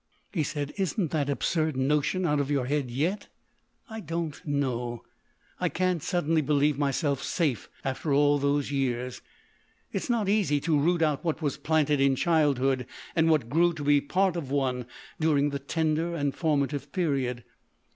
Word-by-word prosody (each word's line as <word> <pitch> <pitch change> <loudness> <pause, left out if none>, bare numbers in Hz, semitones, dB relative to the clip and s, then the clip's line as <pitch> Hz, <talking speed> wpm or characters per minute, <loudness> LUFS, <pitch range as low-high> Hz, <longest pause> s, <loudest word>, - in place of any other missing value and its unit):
He 170 - +1
said: 145 0 -3
"Isn't 190 -3 0
that 145 -3 0
absurd 155 +1 0
notion 150 +7 +1
out 150 -3 +2
of 140 -1 -1
your 140 -3 +1
head 140 -1 -1
yet?" 160 - -1 0.6
"I 220 -2 -7
don't 165 -4 -4
know... 125 -5 -2 0.6
I - - +1
can't 185 -2 0
suddenly 165 -2 +1
believe 145 0 +2
myself 140 0 0
safe 145 - -1 0.2
after 135 +3 -2
all 145 +1 +4
those 140 0 0
years. 125 -2 -2 0.7
It - - -2
is - - -6
not 230 -4 +1
easy 195 -8 +2
to 155 -2 +2
root 170 +3 +2
out 150 -3 0
what 160 -1 -2
was 145 -3 -1
planted 150 -3 +1
in 135 -1 +4
childhood 135 -5 +2 0.3
and 165 -1 +3
what 150 -7 +2
grew 170 +6 +3
to 155 -3 -6
be 145 0 +4
part 185 +5 +1
of 155 -6 -4
one 130 -3 -1 0.3
during 145 -2 +2
the 140 - -3
tender 160 +3 -1
and 145 -3 -1
formative 145 -3 -1
period.... 135 -8 -1
145 Hz, 165 wpm, -27 LUFS, 140-165 Hz, 0.7 s, all